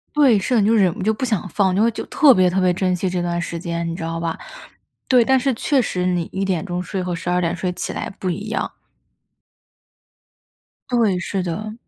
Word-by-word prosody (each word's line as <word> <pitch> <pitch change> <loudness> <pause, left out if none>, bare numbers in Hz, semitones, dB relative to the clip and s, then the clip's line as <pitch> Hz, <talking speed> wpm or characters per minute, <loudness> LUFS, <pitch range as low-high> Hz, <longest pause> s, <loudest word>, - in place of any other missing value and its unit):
对， 270 -8 +5
是 220 +6 0
的， - - +4
你 200 - +2
就 225 - +4
忍 190 -5 +3
不 - - -8
就 215 +3 +2
不 225 - -6
想 215 -5 -1
放， 190 +1 +1
就 200 - +2
会 230 - +4
就 - - -6
特 290 -4 +6
别 185 -4 +4
特 185 - 0
别 185 -1 +3
珍 185 0 0
惜 180 +1 -1
这 180 0 -2
段 175 0 -1
时 170 - -4
间， 170 0 -3
你 165 - -4
知 165 - -6
道 165 0 -3
吧？ 165 0 -3 0.7
对， 250 -2 +5
但 265 +2 +3
是 270 +1 +1
确 265 +3 +1
实 180 -5 -2
你 180 -2 +1
1 195 +1 -1
点 190 -2 -1
钟 180 -1 -3
睡 190 +1 -4
和 180 -1 -3
12 175 +1 -1
点 175 0 0
睡 180 +1 -2
起 180 - -4
来 - - -4
不 185 - -2
一 205 +5 -4
样。 220 - -2 2.2
对， 225 -7 +2
是 190 +1 -2
的。 215 +5 -4
185 Hz, 245 characters per minute, -21 LUFS, 175-215 Hz, 2.2 s, 特